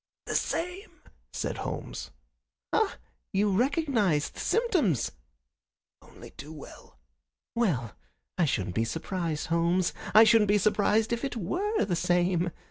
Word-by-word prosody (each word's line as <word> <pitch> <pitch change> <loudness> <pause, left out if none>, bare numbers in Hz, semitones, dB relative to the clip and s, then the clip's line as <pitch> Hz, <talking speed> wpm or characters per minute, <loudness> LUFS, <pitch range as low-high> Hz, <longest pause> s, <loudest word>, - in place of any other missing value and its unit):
"The - - -4
same," 360 +4 -3 0.3
said - - -3
Holmes. - - -5 0.6
"Ah! - - +2 0.4
You 205 +1 +2
recognize 235 - +1
the - - -12
symptoms?" 330 - +1 0.9
"Only - - -14
too 150 - -10
well." 150 - -12 0.6
"Well, 150 - 0 0.4
I 175 - +2
shouldn't 95 - -1
be 115 - +1
surprised, 165 +3 -3
Holmes. 170 +2 +2 0.2
I 220 - +10
shouldn't 220 -1 +5
be 205 +1 +4
surprised 215 +3 +2
if 235 - -2
it 270 -3 -3
WERE 370 - 0
the 185 -3 -1
same. 175 +1 +1
195 Hz, 125 wpm, -28 LUFS, 165-235 Hz, 0.9 s, I